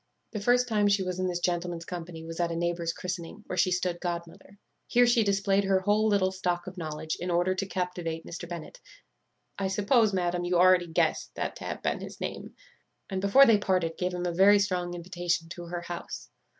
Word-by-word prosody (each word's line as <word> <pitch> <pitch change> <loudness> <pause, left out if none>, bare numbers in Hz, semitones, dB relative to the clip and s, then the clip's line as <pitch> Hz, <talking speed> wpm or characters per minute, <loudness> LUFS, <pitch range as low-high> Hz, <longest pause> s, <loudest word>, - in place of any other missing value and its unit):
"The 215 - -4
first 245 +4 +3
time 210 -3 +2
she 200 -1 +3
was 185 0 -3
in 185 - 0
this 180 -1 -1
gentleman's 175 -1 -2
company 170 -2 -7
was 165 +1 -7
at 170 -1 +1
a - - -2
neighbour's 170 0 -1
christening, 180 +3 -6
where - - -4
she 185 +1 +3
stood 180 -1 -1
godmother. 175 +2 -6 0.3
Here 245 0 +5
she 240 -1 +4
displayed 200 0 +2
her 190 -1 +2
whole 210 +3 +2
little 200 -3 +2
stock 180 -2 -2
of 185 - -8
knowledge, 155 -2 -4
in 180 - -3
order 175 +2 +2
to 190 +1 -3
captivate 180 -3 -3
Mr. 170 0 -7
Bennet 175 - -7 0.8
(I 195 - 0
suppose, 210 +3 +3
madam, 175 -2 0
you 175 0 0
already 180 0 +5
guess 165 - 0
that - - -3
to - - -8
have - - -5
been - - 0
his - - -9
name), - - -6 0.6
and 190 -1 -1
before 200 +8 +7
they 225 -4 +5
parted 180 -5 0
gave 180 0 -2
him 180 0 -3
a 175 - -1
very 195 +4 +6
strong 180 -3 -1
invitation 175 -1 -2
to 175 0 -7
her 175 0 -5
house. 175 0 -7
180 Hz, 210 wpm, -28 LUFS, 175-195 Hz, 0.8 s, before